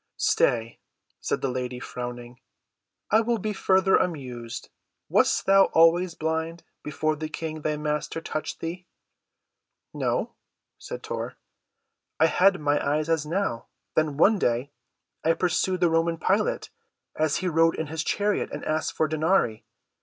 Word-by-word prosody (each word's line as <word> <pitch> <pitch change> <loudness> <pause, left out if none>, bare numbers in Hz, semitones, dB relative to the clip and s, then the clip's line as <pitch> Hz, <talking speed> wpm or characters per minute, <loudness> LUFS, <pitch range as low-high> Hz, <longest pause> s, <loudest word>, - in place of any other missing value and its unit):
"Stay," 115 -1 +1 0.4
said - - -2
the - - 0
lady 125 0 -4
frowning, 120 0 -7 0.7
"I 220 +2 +6
will 235 +1 0
be 215 +1 -3
further 190 -1 +3
amused. 125 -8 -4 0.4
Wast - - +3
thou 195 0 +6
always 170 +1 +4
blind—before 160 -1 -3
the 155 +1 -4
King, 155 0 -5
thy 150 0 -1
Master, 150 +1 -2
touched 155 -1 -5
thee?" 175 +2 -5 1.1
"No," - - -1 0.5
said - - -7
Tor. - - -4 0.8
"I 160 - +6
had 185 +3 +4
my 145 -1 +1
eyes 150 +2 0
as 160 -2 +1
now. 165 -9 -2 0.3
Then 155 -3 +1
one 200 +6 +5
day 125 +2 0 0.5
I 165 - +4
pursued 180 +1 0
the 175 -2 +4
Roman 165 0 +1
Pilate, - - 0 0.4
as 155 -1 +1
he 185 - -1
rode 165 -1 +3
in 160 - -2
his 160 +1 -3
chariot, 205 0 0
and - - -6
asked 155 0 -1
for 155 - +1
denarii. 155 - +1
160 Hz, 140 wpm, -26 LUFS, 145-180 Hz, 1.1 s, I